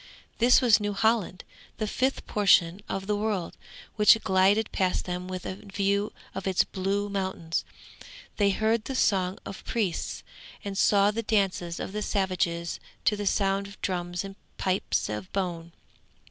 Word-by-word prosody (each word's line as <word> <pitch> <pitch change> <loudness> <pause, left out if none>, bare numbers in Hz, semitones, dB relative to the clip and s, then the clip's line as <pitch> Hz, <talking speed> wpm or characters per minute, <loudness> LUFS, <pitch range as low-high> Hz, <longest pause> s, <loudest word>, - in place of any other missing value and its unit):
This 245 +3 +6
was 235 -5 +5
New 205 -1 -2
Holland, 210 -3 +1 0.3
the 215 - -1
fifth 260 +5 -1
portion 190 -3 +3
of 195 0 -3
the 210 +1 0
world, 205 -4 -2 0.4
which 210 +1 +7
glided 195 +3 +3
past 185 -1 0
them 180 0 -4
with 185 -1 -5
a 185 - -4
view 200 +1 -1 0.2
of 195 0 -5
its 190 -1 +3
blue 195 +1 -2
mountains. 190 -5 -2 0.7
They 205 -1 +4
heard 220 +2 +1
the 270 - -4
song 190 -6 +2
of 195 - -8
priests, 205 -8 -2 0.4
and 200 -1 -4
saw 200 +1 +4
the 225 +2 -2
dances 195 -5 0
of - - -4
the 210 - -2
savages 180 -4 -1 0.3
to 210 - +4
the 205 -1 -3
sound 195 0 +1
of 200 - -13
drums 175 -1 -2
and 195 0 -9 0.2
pipes 185 0 0
of 105 -3 -5
bone. 170 -4 -3
195 Hz, 160 wpm, -27 LUFS, 185-210 Hz, 0.7 s, which